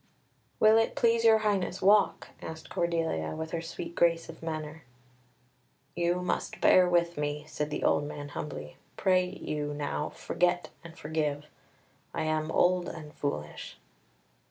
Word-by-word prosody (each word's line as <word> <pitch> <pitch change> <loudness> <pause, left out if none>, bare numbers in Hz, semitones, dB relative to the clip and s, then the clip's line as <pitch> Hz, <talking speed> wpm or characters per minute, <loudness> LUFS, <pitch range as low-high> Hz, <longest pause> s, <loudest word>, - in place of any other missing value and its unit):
"Will 220 +1 +6
it 225 - 0
please 230 -1 +3
your 225 -1 +7
highness 190 -3 0
walk?" 200 -4 +3
asked 160 0 -8
Cordelia, 165 - -1
with 160 0 -5
her 165 - -2
sweet 170 +1 -6
grace 170 -1 +2
of - - -10
manner. 160 -1 -5 1.1
"You 175 +1 0
must - - -2
bear 180 -1 +6
with 170 -1 +2
me," 150 0 -2
said 150 -1 -3
the 150 - -3
old 145 - +3
man 145 -1 -6
humbly. 75 - -6 0.2
"Pray 185 -1 +3
you, 150 -5 -4
now, 150 +1 -2
forget 175 0 0
and 170 0 -12
forgive. 150 -1 -2 0.7
I - - -1
am 155 0 0
old 180 +1 +3
and 155 -2 -9
foolish." 75 - -4
165 Hz, 145 wpm, -29 LUFS, 150-180 Hz, 1.1 s, your